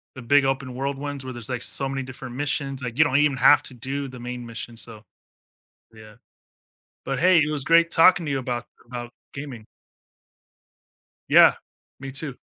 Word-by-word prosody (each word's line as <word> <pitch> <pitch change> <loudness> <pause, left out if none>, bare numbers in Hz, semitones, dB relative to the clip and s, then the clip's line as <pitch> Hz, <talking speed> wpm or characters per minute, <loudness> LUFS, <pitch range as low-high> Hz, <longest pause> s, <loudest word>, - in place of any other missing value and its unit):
The 130 - -9
big 140 +3 +4
open 135 -1 -2
world 135 +1 -3
ones 145 -2 -5
where 130 - -6
there's, 120 0 -9
like, 125 -2 -3
so 135 +1 +1
many 135 0 -3
different 130 -1 -9
missions, 135 -1 -3
like, 125 +2 -6
you 155 - +7
don't 130 - +1
even 145 -2 +3
have 130 - +6
to 130 - -7
do 135 +3 -5
the 125 -2 -11
main 125 0 -6
mission, 115 0 -8
so 110 -2 -9 0.9
yeah. 110 -1 -14 0.9
But 135 0 -3
hey, 180 -1 +5
it 150 - 0
was 145 -3 -3
great 165 +1 +4
talking 170 +1 +5
to 145 - -2
you 135 - 0
about 125 -2 -3 0.2
about 120 0 -7 0.2
gaming. 135 -6 -8 1.6
Yeah. - - +7 0.5
Me 135 0 -6
too 140 -1 -5
135 Hz, 185 wpm, -24 LUFS, 125-140 Hz, 1.6 s, you